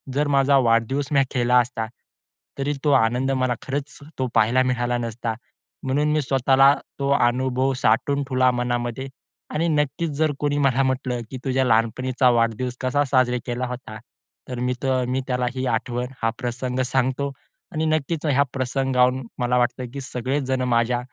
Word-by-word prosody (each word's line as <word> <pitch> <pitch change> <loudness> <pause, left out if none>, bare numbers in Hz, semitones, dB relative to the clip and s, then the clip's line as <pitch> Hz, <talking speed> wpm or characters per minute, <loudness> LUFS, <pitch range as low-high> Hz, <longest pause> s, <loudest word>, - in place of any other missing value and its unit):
जर 145 +1 +1
माझा 140 0 +4
वाढदिवस 125 +3 +2
मी 140 - +5
केला 125 0 +3
असता, 120 -2 -1 0.7
तरी 140 +2 0
तो 150 - +3
आनंद 125 +2 +2
मला 130 -2 +1
खरंच 140 +2 -4 0.2
तो 130 - 0
पाहायला 115 +3 +4
मिळाला 120 -1 0
नसता. 115 -1 -3 0.5
म्हणून 145 +3 +1
मी 155 - +2
स्वतःला 135 0 +4 0.3
तो 140 0 -1
अनुभव 130 +1 +2
साठवून 140 +6 +2
ठेवला 130 -2 +2
मनामध्ये 120 +1 -2 0.5
आणि 165 +3 0
नक्कीच 150 +1 0
जर 155 -1 +2
कोणी 145 0 0
मला 135 -2 +2
म्हटलं 130 -2 -1
की 130 - -5
तुझ्या 130 0 +1
लहानपणीचा 125 +3 +2
वाढदिवस 120 +1 0
कसा 130 +3 +1
साजरा 130 -2 +2
केला 125 +1 -2
होता, 125 -3 -7 0.5
तर 125 -1 -4
मी 125 +1 0
तर 130 -1 +1
मी 130 +1 0
तो - - -14
त्याला 125 -1 0
ही 130 0 -2
आठवण, 120 +1 -1 0.2
हा 115 - +3
प्रसंग 125 +1 -3
सांगतो 130 +2 0 0.4
आणि 155 0 -1
नक्कीच 155 0 -1
ह्या 140 -1 +4
प्रसंगाहून 130 -1 +1
मला 125 0 +1
वाटतं 125 0 0
की 140 - -5
सगळे 130 +2 -2
जण 130 -1 -1
माझ्या 120 +1 +2
130 Hz, 165 wpm, -23 LUFS, 125-135 Hz, 0.7 s, मी